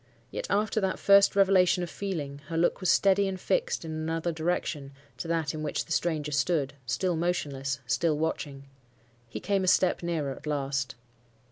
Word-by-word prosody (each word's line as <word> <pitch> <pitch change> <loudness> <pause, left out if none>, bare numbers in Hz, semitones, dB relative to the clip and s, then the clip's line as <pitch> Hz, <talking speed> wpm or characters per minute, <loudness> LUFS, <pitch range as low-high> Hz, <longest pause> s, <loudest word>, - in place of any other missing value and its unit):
Yet - - -4
after 210 +1 +1
that 190 -1 0
first 200 0 +5
revelation 190 -2 +4
of 175 - -4
feeling, 150 -8 -4
her 165 - -3
look 170 - +2
was 185 - +1
steady 195 0 +4
and 190 -1 -4
fixed - - -1
in 160 - -5
another 160 +2 -2
direction 160 -4 -2 0.2
to - - -5
that 165 -3 0
in 155 - -5
which 150 -2 -2
the - - -13
stranger 155 -3 0
stood,—still 140 +1 0
motionless—still 140 -3 -1
watching. 145 -3 -3 0.7
He - - -5
came 200 -1 0
a - - -1
step 185 0 +3
nearer 165 -5 -2
at 150 +3 -9
last. 140 -2 -2
165 Hz, 165 wpm, -28 LUFS, 145-185 Hz, 0.7 s, first